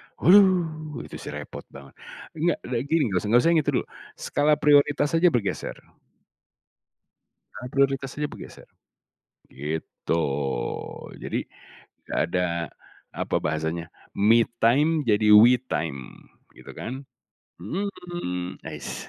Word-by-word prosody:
Uh, 170 -5 +3
itu - - -10
sih - - -7
repot - - -8
banget, 70 0 -12 0.5
nggak 170 0 +1
kayak 120 0 0
gini, 160 +1 +2
nggak 95 - +1
usah 105 - -6
nggak 120 +3 +5
usah 165 - +4
yang 155 -3 +3
dulu, 125 - +1 0.5
skala 145 +1 +2
prioritas 145 0 +4
saja 165 +2 +4
bergeser. 110 -5 -2 1.8
Skala 125 - -8
prioritas 135 -1 +1
aja 150 0 -2
bergeser, - - -12 0.8
gitu. 80 +3 -3 1.0
Jadi, - - -2 0.7
tidak - - -2
ada 90 0 +1 0.6
apa - - -3
bahasanya 80 +2 -2 0.3
me 115 +3 +4 0.2
time 150 +7 +3
jadi 105 0 +3
we 125 +2 +6
time, 70 -6 -5 0.3
gitu - - -12
kan, 125 - -6 0.7
mmm, 175 - -5
ais. - - -7
130 Hz, 115 wpm, -25 LUFS, -, 1.8 s, we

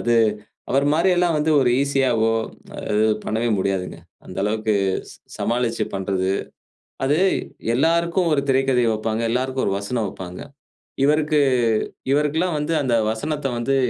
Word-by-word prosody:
அது 120 0 +1 0.6
அவர் 135 +2 +2
மாரி 165 +4 +3
எல்லாம் 175 -2 +2
வந்து 150 +1 +1
ஒரு 125 -2 +3
ஈசியவோ 125 -5 +2 0.6
அது 105 - +1 0.3
பண்ணவே 115 +2 -1
முடியாதுங்க. 95 -1 -2 0.3
அந்த - - -10
அளவுக்கு 110 +1 0 0.4
ஸ் - - -13 0.2
சமாளிச்சு 120 0 0
பண்றது. 95 -1 -1 0.7
அது 145 +3 +2 0.6
எல்லாருக்கும் 170 +5 +2
ஒரு 140 - +2
திரைக்கதை 130 -2 +3
வைப்பாங்க. 110 +1 -2
எல்லாருக்கும் 130 +2 -1
ஒரு 95 - +1
வசனம் 110 +2 -2
வைப்பாங்க. 90 -1 -8 0.6
இவருக்கு 150 +1 +3 0.7
இவருக்கெல்லாம் 150 +4 +1
வந்து 150 +2 -2
அந்த 130 -4 +1 0.2
வசனத்தை 145 +5 -2
வந்து 135 +3 0
130 Hz, 130 wpm, -22 LUFS, 110-150 Hz, 0.7 s, மாரி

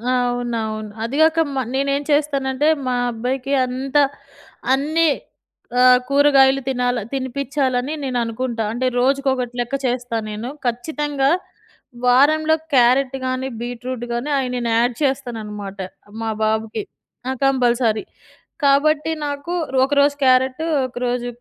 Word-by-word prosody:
అవునవును. 235 -3 -2
అదిగాక 315 +7 +2 0.2
మా 265 - +1
నేనేం 275 +1 0
చేస్తానంటే 285 -1 +1 0.2
మా 250 - +1 0.2
అబ్బాయికి 255 +4 -2
అంతా 270 +3 +1 0.7
అన్నీ 310 +4 +2 0.7
ఆహ్, 250 0 +7
కూరగాయలు 275 -1 +5
తినాల 245 -2 0
తినిపించాలని 265 +1 -1
నేను 255 -2 -2
అనుకుంటా. 230 0 -3
అంటే 255 +2 -1
రోజుకొకటి 265 -2 +1
లెక్క 240 +3 -1
చేస్తా 245 -2 -1
నేను. 215 +4 -5 0.2
ఖచ్చితంగా 280 +3 -1 0.8
వారంలో 310 +5 +4 0.2
క్యారెట్ 255 +2 +4
కాని, 255 +1 -2
బీట్‌రూట్ 245 0 -5
కానీ 240 +5 -3
అయి 255 -1 -2
నేను 240 -1 -2
యాడ్ 240 0 +2
చేస్తాననమాట 210 -7 -3 0.4
మా 225 - -2
బాబుకి. 220 0 -1 0.5
ఆ! - - +1
కంపల్సరీ. 240 -4 +2 0.6
కాబట్టి 300 +3 +3
నాకు 285 +4 -4 0.3
ఒకరోజు 285 +1 +3
క్యారెటు, 260 +4 +3 0.2
ఒకరోజు 245 0 -2
255 Hz, 110 wpm, -20 LUFS, 240-280 Hz, 0.8 s, ఆహ్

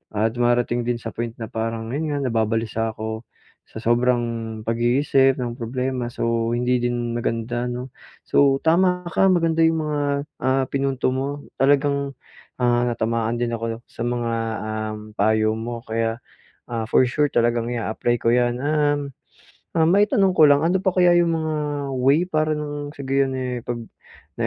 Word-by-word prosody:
ah, 110 +2 +1
dumarating 120 0 +1
din 120 - +1
sa 115 -1 -6
point 115 +2 -5
na 115 -2 -7
parang 115 0 -3
yun 155 +4 -2
nga, 145 -2 -2
nababalisa 115 -2 -1
ako 110 0 -4 0.4
sa - - -10
sobrang 115 -1 0
pag-iisip 130 +3 +2
ng 120 -2 -3
problema, 125 0 -3
so 115 -1 -1
hindi 125 +1 +1
din 120 -1 -1
maganda 120 +1 -2
'no? 125 +1 -5 0.3
So, 135 -1 +4
tama 180 +2 +2
ka 190 +3 +3
maganda 165 -2 +2
yung 160 0 +3
mga, 150 -1 -1 0.4
ah, 130 +1 +2
pinunto 135 -1 0
mo 140 +2 -4
talagang, 140 0 +2 0.5
ah, 120 -1 +2
natamaan 115 0 -1
din 120 -1 -1
ako 115 0 -4
sa 115 - -6
mga, 120 -1 -1 0.4
um, 110 0 -4 0.2
payo 110 +1 +2
mo 115 +1 -5
kaya, 115 0 -2 0.5
ah, 115 -2 -2
for 115 - +4
sure 145 +4 +2
talagang 120 -3 +1
i-a-apply 120 0 -1
ko 115 - +3
yan. 120 +1 +1
Um, 145 -1 +1 0.7
ah, 165 - +3
maitanong 195 +1 +3
ko 155 - +9
lang 145 +1 +4
ano 175 +3 +2
pa 190 -2 +1
kaya 175 -1 +5
yung 170 -1 +2
mga 160 -1 -1 0.4
way 135 +5 +4
para 155 -1 +1
nang 145 0 -5
sa 140 - -8
gayon, 135 0 +1
eh, 125 -1 -3
pag 120 -1 -2 0.6
na - - +1
120 Hz, 160 wpm, -22 LUFS, 115-145 Hz, 0.7 s, ko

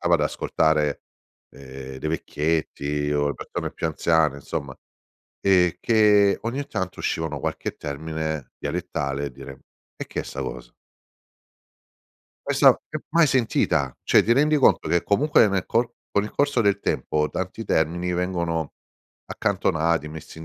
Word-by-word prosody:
stava 85 0 +3
ad 80 - +2
ascoltare, 75 0 +1 0.5
ehm, 65 -1 -10
dei 75 - -3
vecchietti 75 -2 -1
o 75 0 +1
le 70 - -2
persone - - -5
più - - -3
anziane, 80 -2 +2
insomma, 70 -1 -5 0.7
ehm, 90 -3 +4
che 105 -3 +4
ogni 130 +5 -3
tanto 95 -9 -4
uscivano 80 -3 -2
qualche - - -3
termine 80 0 -4
dialettale 70 +1 -3
e 70 - -6
dire: 70 +1 -11 0.4
"E - - -7
che - - -3
è - - -11
'sta - - -6
cosa?" - - -7 1.7
Esa - - +5
che - - -3 0.2
mai 170 -1 +6
sentita, 110 - +1
cioè - - +5
ti 115 - -2
rendi 150 +3 +3
conto 95 - +4
che 85 +2 +2
comunque 120 +1 +4
nel 95 -2 -1
co 120 +1 0 0.2
con 100 0 +1
il 105 - -6
corso 140 -3 +1
del 100 -3 +2
tempo 75 0 0
tanti 95 +5 -4
termini 85 0 0
vengono 85 -3 -2 0.5
accantonati, 85 -5 0
messi 80 +1 -10
in 80 - -8
80 Hz, 145 wpm, -24 LUFS, 75-100 Hz, 1.7 s, mai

